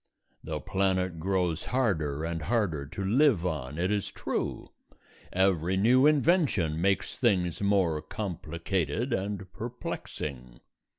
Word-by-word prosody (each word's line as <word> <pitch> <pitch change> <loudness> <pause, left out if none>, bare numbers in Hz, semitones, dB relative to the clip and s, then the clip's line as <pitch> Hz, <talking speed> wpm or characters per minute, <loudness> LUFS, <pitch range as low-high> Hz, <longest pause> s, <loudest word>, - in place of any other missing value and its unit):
The 75 -1 -3
planet 95 +1 0
grows 90 -2 0
harder 80 - 0
and 85 -1 -3
harder 80 -7 0
to 95 +6 -5
live 115 - +3
on, 75 -4 -3
it 90 +3 0
is 105 -2 0
true; - - -3 0.6
every 95 -1 +2
new 125 +7 +5
invention 145 - +2
makes 100 +1 0
things 95 - +1
more 95 -6 +2
complicated 90 - -2
and 95 -2 -3
perplexing. 70 - -6
95 Hz, 115 wpm, -29 LUFS, 80-105 Hz, 0.6 s, new